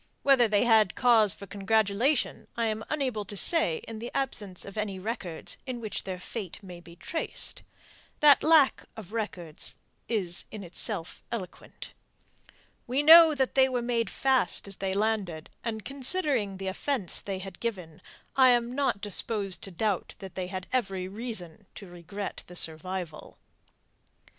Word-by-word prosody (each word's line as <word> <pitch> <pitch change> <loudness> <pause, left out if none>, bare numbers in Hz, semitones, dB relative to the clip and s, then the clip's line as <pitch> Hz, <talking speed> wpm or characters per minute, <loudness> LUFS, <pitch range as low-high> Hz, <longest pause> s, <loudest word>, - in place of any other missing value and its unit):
Whether 265 -4 +5
they 210 0 +2
had 220 -5 +4
cause 230 -5 +5
for 200 - -8
congratulation, 215 +7 0
I 230 - +1
am 220 0 -2
unable 260 -8 -1
to 205 +1 -6
say 195 - +5
in 225 -1 -7
the 235 +2 -5
absence 210 -9 -2
of 200 - -10
any 210 -3 -3
records 185 -4 -4
in 250 -2 -4
which 220 -3 -4
their 185 -1 -5
fate 190 -1 -6
may 180 -2 -10
be 170 -1 -14
traced. 325 - 0 0.6
That 290 -2 +7
lack 310 -3 +4
of 215 -1 -10
records 180 -8 -4 0.3
is 185 -7 -1
in 215 -2 -8
itself 180 0 -4
eloquent. 195 -7 -7 1.0
We 260 +4 +1
know 325 0 +9
that 265 -2 0
they 265 -1 +4
were 250 -2 -1
made 235 -1 0
fast 265 -5 +1
as 195 - -2
they 195 -1 -2
landed, 200 -7 -1
and 220 -2 -4
considering 275 - 0
the 195 - -6
offence 190 - -2
they 195 -1 -4
had 190 -1 -9
given 180 -9 -5 0.3
I 260 -1 +7
am 240 0 +2
not 270 -7 0
disposed 205 -2 -2
to - - -8
doubt 195 +1 -2
that 190 -2 -10
they 185 -1 -4
had 185 0 -5
every 195 -7 -1
reason 200 -3 -4
to 200 - -9
regret 180 +3 -7
the 180 - -12
survival. 165 0 -3
210 Hz, 155 wpm, -28 LUFS, 185-245 Hz, 1.0 s, know